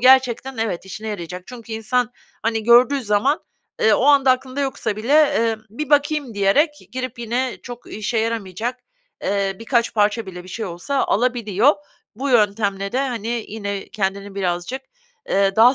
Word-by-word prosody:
gerçekten, 260 0 +4
evet, 220 -6 -2
işine 215 +3 -6
yarayacak 180 -3 -5
çünkü 235 -2 -9
insan, 240 +2 0 0.3
hani, 225 0 0
gördüğü 245 +4 +6
zaman, 230 +7 +2 0.4
eee, 220 - +5
o 245 - +1
anda 280 -2 +6
aklında 260 +1 0
yoksa 270 -6 -2
bile, 230 +6 -1
eee, 230 -7 +4
"Bir 285 +6 -5
bakayım." 290 -4 +2
diyerek 205 +11 +3 0.2
girip 255 -1 -4
yine 240 +2 -1
çok 245 -1 -9
işe 215 +3 -1
yaramayacak, 225 +1 -2 0.4
eee, 195 -1 0
birkaç 235 +1 0
parça 210 +1 +2
bile 180 -1 -8
bir - - -12
şey 220 +5 -4
olsa 185 +11 -1
alabiliyor. 235 +2 +2 0.4
Bu 265 +6 -3
yöntemle 200 -3 +2
de, 255 - +1
hani, 230 -1 -3
yine 200 -2 -4
kendini 200 -1 -3
birazcık, 185 +6 -2 0.5
eee, 195 0 +2
daha 240 +4 +7
230 Hz, 155 wpm, -21 LUFS, 200-255 Hz, 0.5 s, daha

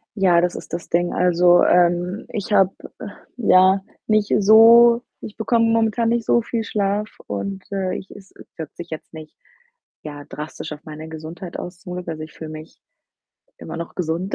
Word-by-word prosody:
Ja, 180 -4 +3
das 180 0 -1
ist - - -10
das 170 - -5
Ding, 175 +1 +1
also, 175 0 +4
ähm, 175 +3 +2
ich 210 -1 -4
habe, 195 -2 +4 0.7
ja, 190 -4 +4 0.3
nicht 215 -1 +1
so 235 +3 +7 0.2
ich 210 - -9
bekomme 230 +1 +1
momentan 225 0 +1
nicht 235 -1 0
so 235 - +3
viel 230 0 -3
Schlaf 205 0 -1 0.2
und, 190 - -5
äh, 190 -2 -2
ich 190 - -11
es 195 -1 -14 0.3
wirkt 160 -2 -8
sich 175 - -8
jetzt 160 - -8
nicht, 155 -1 -11 0.7
ja, 145 -1 -8
drastisch 150 +3 -8
auf 150 - -11
meine 155 0 -9
Gesundheit 160 +3 -8
aus, 175 0 -8
zum 180 -3 -8
Glück. 180 -1 -7
Also, 155 -1 -5
ich 155 - -11
fühle 160 -1 -9
mich 155 +1 -11 0.8
immer - - -8
noch 170 - -7
gesund, 175 +2 -2
180 Hz, 175 wpm, -21 LUFS, 165-210 Hz, 0.8 s, so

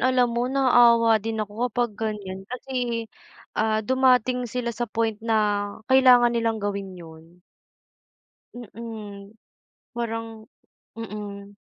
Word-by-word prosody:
alam 250 -2 +2
mo 240 +2 0
naawa 235 -4 +5
din 225 +1 -4
ako 220 +5 -3
kapag 240 0 -1
ganyan 205 -3 -5
kasi, 245 -2 -3 0.5
ah, 220 0 0
dumating 255 -1 +2
sila 240 +1 -3
sa 240 0 -4
point 225 -1 -1
na 225 -1 0 0.6
kailangan 250 -2 +6
nilang 230 -1 0
gawin 200 -2 -4
yun. 165 +1 -14 1.1
Mm, 215 -3 -9 0.6
parang 225 -1 -5 0.5
mm. 205 -2 -8
225 Hz, 110 wpm, -24 LUFS, 210-245 Hz, 1.1 s, kailangan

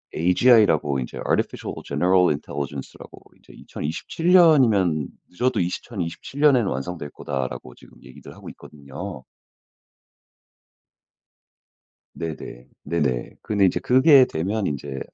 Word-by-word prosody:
AGI라고 90 - +3
이제 60 - -7
Artificial - - -2
general 90 +5 +2
intelligence라고 70 -1 -6 0.2
이제 - - -19
2027 160 - -4
년이면 110 - +4 0.2
"늦어도 120 +4 -1
2027 90 +6 -5
년에는 130 -8 +4
완성될 75 +2 -5
거다."라고 65 -2 -5
지금 - - -19
얘기를 - - -13
하고 - - -11
있거든요. 70 +2 -10 2.9
네네. 75 -7 -7 0.2
네네. - - -2
그런데 100 -2 +1
인제 90 - +1
그게 130 +1 +5
되면 100 +3 -3
인제 70 -1 -4
90 Hz, 325 characters per minute, -23 LUFS, 70-115 Hz, 2.9 s, 그게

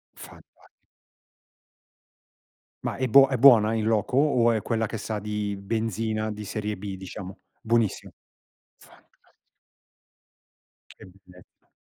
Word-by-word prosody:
Fantas - - -16 2.2
Ma - - -3
è 130 - -2
buo 135 +3 +7
è 130 - -1
buona 115 -4 +6
in 110 -1 -1
loco? 110 +2 0
O 125 -5 +3
è 110 - -1
quella 115 -1 -1
che 110 - -6
sa 110 0 -4
di 105 0 -4
benzina 110 +1 -3
di 105 0 -8
serie 105 -1 -4
B 100 -1 -6
diciamo? 95 0 -9 0.2
Buonissimo. 115 -2 -1 0.7
Fantastic - - -24 1.6
Che - - -15
bellezza. 90 -1 -21
110 Hz, 115 wpm, -25 LUFS, 105-115 Hz, 2.2 s, buo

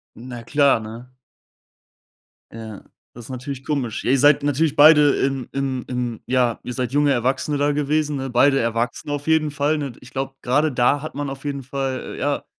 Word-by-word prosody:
Na 120 0 -9
klar, 140 -1 +3
ne? 115 +3 -9 1.5
Ja, 110 -2 -9 0.3
das 120 -1 -11
ist - - -13
natürlich 130 +1 -6
komisch. 135 -8 -3
Ihr 135 +3 +3
seid 145 +2 +5
natürlich 145 +1 +1
beide 150 0 +7
in 135 -2 -1
in 135 -2 -2
in 125 -3 -4
ja, 125 -2 +1
ihr 125 - -6
seid 125 0 -3
junge 145 0 +3
Erwachsene 130 +3 0
da 145 +1 +2
gewesen, 150 +1 0
ne? 135 -1 -4
Beide 135 +3 +4
Erwachsene 115 +4 -2
auf 145 0 -4
jeden 160 -1 +2
Fall, 145 +2 0
ne? 140 -3 -4
Ich 125 - -14
glaub, 135 0 -5
grade 145 +5 +1
da 130 +3 +2
hat 155 - -7
man 145 0 -3
auf 135 +1 -8
jeden 140 -1 -3
Fall, 135 0 -4
äh, - - -10
ja, 145 0 -1
135 Hz, 190 wpm, -21 LUFS, 125-145 Hz, 1.5 s, beide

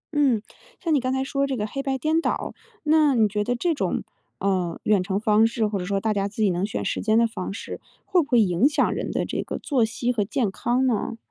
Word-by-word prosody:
嗯， 265 -8 +3 0.4
像 335 -4 0
你 290 - +4
刚 255 0 -1
才 265 0 0
说 275 +1 -1
这 270 -2 -2
个 210 - -1
黑 275 +6 -4
白 270 -1 -1
颠 310 +4 +1
倒， - - -2 0.3
那 305 -2 +4
你 220 -2 +4
觉 210 0 -1
得 245 +3 -1
这 335 +8 0
种， 290 - -1 0.3
呃， 185 -4 -1
远 210 -3 +3
程 190 +1 -1
方 215 +1 +4
式 230 -1 -1
或 205 -2 -1
者 180 - -4
说 195 +1 0
大 220 +2 0
家 200 -1 0
自 215 +2 -3
己 200 - +3
能 180 +3 -1
选 210 - -4
时 - - -1
间 220 0 +2
的 230 - +5
方 210 -5 -4
式， 200 - -7 0.2
会 365 -2 +3
不 290 - -5
会 245 - +4
影 195 +5 +3
响 300 - +1
人 - - -3
的 - - -1
这 - - -3
个 - - -5
作 265 -6 +1
息 235 +2 -1
和 215 -3 +1
健 215 +1 -1
康 245 +6 0
呢？ 230 -2 -1
225 Hz, 275 characters per minute, -24 LUFS, 205-270 Hz, 0.4 s, 的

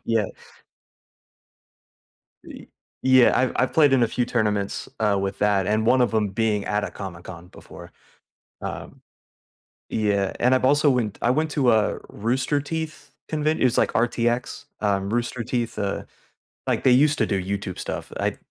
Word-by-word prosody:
Yeah. 115 -2 +1 2.2
Y - - -11 0.4
yeah, 130 -1 +6
I've 130 - +1
I've 130 - +1
played 145 -4 +4
in 130 - +4
a 115 - +3
few 125 +2 -1
tournaments, 105 -4 -1
uh, 105 -2 +2
with 100 0 -3
that, 100 -2 +2
and 110 +2 +1
one 130 +2 +4
of 125 - +2
'em 105 -2 +2
being 105 0 0
at 105 0 -1
a 95 - -5
Comic 90 -2 -8
Con 90 -1 -10
before. - - -13 0.7
Um, - - -7 0.9
yeah, 100 -3 0
and 125 +2 +3
I've 130 - +1
also 145 +2 +4
went 120 -6 0
I 120 - +3
went 155 +3 0
to 135 -5 +3
a 110 -2 +2
Rooster 130 +6 -1
Teeth 155 -1 -5 0.2
convent 155 0 0
it - - +3
was, 125 -1 +2
like, - - +2
RTX, 120 +3 0 0.2
um, 100 -1 0
Rooster 120 +1 -2
Teeth, 120 0 -3
uh, 100 -1 -2 0.6
like, - - 0
they 130 - +6
used 145 +4 +4
to - - +2
do 100 -3 -1
YouTube 100 -1 -4
stuff, - - -5
I'm - - -1
115 Hz, 170 wpm, -23 LUFS, 100-130 Hz, 2.2 s, yeah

